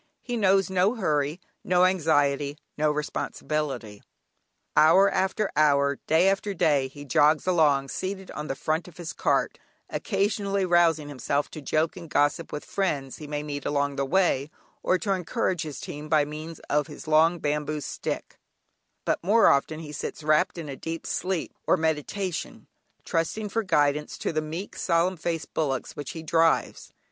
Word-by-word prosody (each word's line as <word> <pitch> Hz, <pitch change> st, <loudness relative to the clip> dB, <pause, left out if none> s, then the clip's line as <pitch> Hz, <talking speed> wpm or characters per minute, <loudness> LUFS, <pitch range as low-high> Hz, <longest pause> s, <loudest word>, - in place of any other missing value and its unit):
He 245 Hz, -, -3 dB
knows 195 Hz, -4 st, +3 dB
no 190 Hz, +4 st, +2 dB
hurry, 150 Hz, -, 0 dB, 0.2 s
no 180 Hz, 0 st, +4 dB
anxiety, 145 Hz, -5 st, +2 dB, 0.2 s
no 155 Hz, 0 st, +2 dB
responsibility. 150 Hz, -6 st, -3 dB, 0.7 s
Hour 185 Hz, +6 st, +6 dB
after 195 Hz, +2 st, 0 dB
hour, 140 Hz, -2 st, +3 dB
day 160 Hz, +4 st, +4 dB
after 195 Hz, +1 st, 0 dB
day 145 Hz, -5 st, +2 dB
he 145 Hz, +2 st, -11 dB
jogs 150 Hz, +3 st, +3 dB
along, 150 Hz, -7 st, +3 dB
seated 190 Hz, +3 st, -4 dB
on 150 Hz, 0 st, -5 dB
the 135 Hz, -, -2 dB
front 155 Hz, +5 st, -1 dB
of 175 Hz, -, -14 dB
his 175 Hz, -2 st, -6 dB
cart, -, -, 0 dB, 0.3 s
occasionally 200 Hz, -1 st, 0 dB
rousing 170 Hz, -4 st, +3 dB
himself 145 Hz, +1 st, -2 dB
to 155 Hz, -, -8 dB
joke 155 Hz, +3 st, 0 dB
and 170 Hz, -3 st, -9 dB
gossip 145 Hz, +3 st, +1 dB
with 150 Hz, -, -5 dB
friends 145 Hz, -9 st, -2 dB
he 150 Hz, -, -9 dB
may 150 Hz, 0 st, -3 dB
meet 145 Hz, -1 st, -4 dB
on 140 Hz, -1 st, 0 dB
the 140 Hz, -, 0 dB
way, 145 Hz, -2 st, +2 dB, 0.3 s
or 185 Hz, -, +2 dB
to 195 Hz, +3 st, -1 dB
encourage 185 Hz, -1 st, -1 dB
his 150 Hz, -4 st, -5 dB
team 150 Hz, +1 st, -7 dB
by 150 Hz, -2 st, +4 dB
means 155 Hz, +2 st, -7 dB
of 150 Hz, 0 st, 0 dB
his 150 Hz, 0 st, -10 dB
long 160 Hz, +3 st, +4 dB
bamboo 150 Hz, 0 st, -1 dB
stick, -, -, -5 dB, 0.7 s
but -, -, 0 dB
more 215 Hz, +5 st, +5 dB
often 155 Hz, +3 st, +1 dB
he 150 Hz, -2 st, -8 dB
sits 150 Hz, +1 st, -5 dB
wrapped 155 Hz, +5 st, +2 dB
in 165 Hz, -3 st, -6 dB
a 140 Hz, -, -5 dB
deep 165 Hz, +4 st, -6 dB
sleep, 185 Hz, -3 st, -2 dB
or -, -, +4 dB
meditation, 160 Hz, +3 st, -2 dB, 0.4 s
trusting 205 Hz, +6 st, -1 dB
for 225 Hz, -, 0 dB
guidance 150 Hz, -6 st, +1 dB
to -, -, -2 dB
the 155 Hz, -, +1 dB
meek 160 Hz, +6 st, -6 dB
solemn 175 Hz, +2 st, +1 dB
faced 165 Hz, -2 st, -4 dB
bullocks 135 Hz, -5 st, -2 dB
which 145 Hz, -, -6 dB
he 160 Hz, -, -7 dB
drives. 165 Hz, +1 st, +1 dB
155 Hz, 165 wpm, -26 LUFS, 145-185 Hz, 0.7 s, Hour